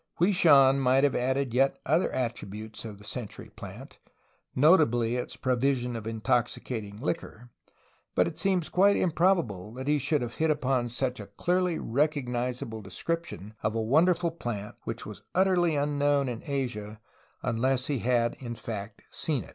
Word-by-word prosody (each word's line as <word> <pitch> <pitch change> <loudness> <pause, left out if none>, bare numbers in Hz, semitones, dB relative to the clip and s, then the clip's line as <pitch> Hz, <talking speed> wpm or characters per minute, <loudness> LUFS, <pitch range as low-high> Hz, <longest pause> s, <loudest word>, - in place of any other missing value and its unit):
Hwui 180 +5 +4
Shan 140 -6 +6
might 130 +1 +3
have 145 -2 +3
added 130 0 0
yet 135 +2 +3
other 160 +5 +2
attributes 110 -3 -4
of 105 -2 -7
the 100 - -15
century 110 +1 -6
plant, - - -10 0.6
notably 125 -7 +4
its 125 - -3
provision 125 -1 0
of 110 -1 -5
intoxicating 110 -1 -1
liquor, 120 -3 -4 0.6
but - - +4
it - - -6
seems 185 -4 +1
quite 200 +2 +4
improb 180 +1 +3
able 100 -2 -8
that 130 +2 -6
he 150 0 +3
should 145 0 +1
have 120 -1 -6
hit 160 0 +2
upon 130 -5 +1
such 125 +1 -2
a 100 - -8
clearly 180 - 0
recognizable 125 -4 -1
description 140 - -4
of 110 +1 -1
a 115 - 0
wonderful 165 +7 +3
plant 110 -10 -5
which - - -4
was - - -9
utterly 180 -3 +3
unknown 145 -1 +1
in 120 -2 -4
Asia 110 -7 -3 0.4
unless 130 +2 +1
he 140 -4 -1
had 120 -1 +1
in 120 -3 -6
fact 105 -2 -7
seen 145 -9 -1
it. - - -14
130 Hz, 160 wpm, -28 LUFS, 115-150 Hz, 0.6 s, Shan